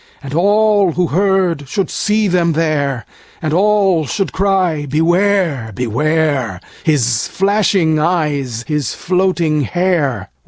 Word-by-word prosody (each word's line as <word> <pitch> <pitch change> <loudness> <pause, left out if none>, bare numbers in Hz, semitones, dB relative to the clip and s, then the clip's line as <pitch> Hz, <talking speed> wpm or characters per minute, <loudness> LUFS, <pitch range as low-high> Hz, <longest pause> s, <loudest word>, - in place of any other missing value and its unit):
And 135 0 -7
all 205 +1 +3
who 180 +2 0
heard 180 -4 0
should 195 +2 -2
see 215 0 0
them 175 -2 +1
there, 145 -6 -1 0.3
And 155 -2 -3
all 195 -4 +2
should 200 -3 -2
cry, 185 -6 0
Beware! 165 - +1
Beware! 135 - -1 0.2
His 120 -8 +1
flashing 195 -5 +1
eyes, 145 -8 -1
his 150 -5 -2
floating 180 -4 0
hair! 145 - -1
165 Hz, 115 wpm, -16 LUFS, 145-190 Hz, 0.3 s, all